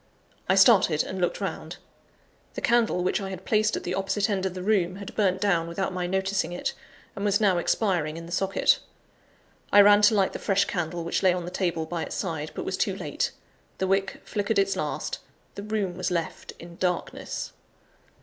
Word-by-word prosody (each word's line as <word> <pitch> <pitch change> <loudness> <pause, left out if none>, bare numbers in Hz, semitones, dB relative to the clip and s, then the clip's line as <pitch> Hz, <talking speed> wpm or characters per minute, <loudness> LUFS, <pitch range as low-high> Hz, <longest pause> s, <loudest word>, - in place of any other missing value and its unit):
I 190 - +5
started 190 -6 +5
and 190 -1 -5
looked 175 - 0
round. - - -5 0.8
The - - -3
candle, 235 -6 +2
which 185 - 0
I 195 - -4
had 190 -1 -8
placed 215 0 +2
at - - -6
the 180 - -3
opposite 195 +2 0
end 190 -1 0
of 185 - -6
the 185 - -5
room, 185 -3 +1
had 200 0 -8
burnt 190 -3 +1
down 175 -5 +1
without 190 +3 -3
my 180 -1 -2
noticing 190 0 -1
it, 175 - -3 0.4
and 200 - -5
was 205 -1 +2
now 195 -5 +3
expiring 170 -6 0
in 165 - -7
the 170 - -11
socket. 195 +2 +2 0.9
I 205 - +7
ran 205 +1 +7
to 210 +1 +5
light 195 -2 +2
the - - -5
fresh 195 -1 +2
candle 175 -1 -3
which 170 - -1
lay 185 -2 +4
on 175 -1 -3
the 175 - -6
table 170 -4 -1
by 170 +1 -4
its - - -5
side, 160 -5 -3
but - - -4
was - - -2
too - - 0
late. - - -2 0.5
The 190 - 0
wick 195 0 0
flickered 205 +1 -1
its 195 0 +2
last; - - -3 0.3
the - - -7
room 205 -4 -2
was 185 0 -2
left 170 -2 -3
in 170 0 -12
darkness. 180 -2 -3
190 Hz, 205 wpm, -26 LUFS, 175-200 Hz, 0.9 s, I